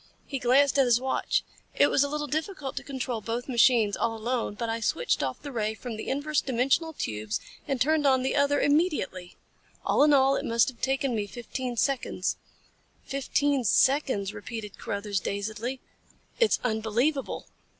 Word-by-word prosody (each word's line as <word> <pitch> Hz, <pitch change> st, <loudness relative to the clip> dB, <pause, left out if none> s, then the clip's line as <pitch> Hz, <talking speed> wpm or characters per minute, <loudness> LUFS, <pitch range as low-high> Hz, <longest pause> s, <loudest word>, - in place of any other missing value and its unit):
He 275 Hz, -, -4 dB
glanced 275 Hz, +3 st, +4 dB
at 270 Hz, -, +6 dB
his 240 Hz, -1 st, +4 dB
watch. 260 Hz, +1 st, 0 dB, 0.3 s
"It -, -, +5 dB
was 275 Hz, -, +4 dB
a 285 Hz, -, -1 dB
little 300 Hz, 0 st, -2 dB
difficult 305 Hz, -1 st, -3 dB
to -, -, -4 dB
control 255 Hz, -4 st, -4 dB
both 235 Hz, +3 st, -4 dB
machines 235 Hz, -4 st, +4 dB
all 225 Hz, -1 st, -1 dB
alone, 230 Hz, -1 st, -2 dB
but 230 Hz, +2 st, -3 dB
I 225 Hz, 0 st, -2 dB
switched 165 Hz, -7 st, 0 dB
off 130 Hz, -2 st, -2 dB
the 285 Hz, -, -6 dB
ray 220 Hz, -3 st, -1 dB
from 240 Hz, 0 st, -6 dB
the 215 Hz, -, -6 dB
inverse 285 Hz, +2 st, 0 dB
dimensional 270 Hz, +6 st, +1 dB
tubes 110 Hz, -, -3 dB, 0.3 s
and 270 Hz, -2 st, -1 dB
turned 300 Hz, +3 st, +3 dB
on 260 Hz, -1 st, +3 dB
the 265 Hz, -, 0 dB
other 285 Hz, 0 st, +3 dB
immediately. 290 Hz, -, 0 dB, 0.5 s
All -, -, +4 dB
in 300 Hz, -, +5 dB
all 275 Hz, -1 st, +5 dB
it -, -, -2 dB
must 230 Hz, +2 st, +2 dB
have 245 Hz, -3 st, -13 dB
taken 270 Hz, -1 st, 0 dB
me 210 Hz, -2 st, -1 dB
fifteen 240 Hz, +2 st, -5 dB
seconds." 275 Hz, +2 st, 0 dB, 0.7 s
"Fifteen 275 Hz, 0 st, 0 dB
seconds," 235 Hz, -3 st, +2 dB
repeated 210 Hz, -1 st, -7 dB
Carruthers, 200 Hz, -1 st, -2 dB
dazedly. 215 Hz, +7 st, -3 dB, 0.6 s
"It's 460 Hz, -2 st, +3 dB
unbelievable." 240 Hz, +5 st, 0 dB
255 Hz, 170 wpm, -27 LUFS, 220-280 Hz, 0.7 s, at